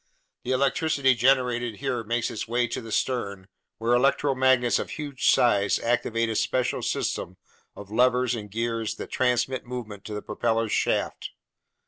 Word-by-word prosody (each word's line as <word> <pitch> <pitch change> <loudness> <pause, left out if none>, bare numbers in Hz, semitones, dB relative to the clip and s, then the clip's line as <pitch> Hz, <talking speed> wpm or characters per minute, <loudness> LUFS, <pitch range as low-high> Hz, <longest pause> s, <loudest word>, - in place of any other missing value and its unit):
The 125 - -3
electricity 140 +1 +2
generated 120 -2 +2
here 125 -1 -2
makes 115 +2 -1
its 110 - -5
way 120 +1 +1
to - - -4
the 115 -1 -9
stern, 100 -7 -2 0.3
where 115 +2 +1
electromagnets 130 -1 +3
of - - -4
huge 145 -4 -1
size 105 -4 +3
activate 115 -1 0
a 110 - -2
special 125 +3 0
system 90 +2 -2 0.4
of 100 0 -11
levers 125 +1 +3
and 105 -3 -5
gears 115 +1 -2
that - - -8
transmit 130 0 0
movement 115 -5 -7
to 105 - -5
the 105 - -5
propeller's 115 0 -1
shaft. - - 0
120 Hz, 150 wpm, -26 LUFS, 110-130 Hz, 0.4 s, electromagnets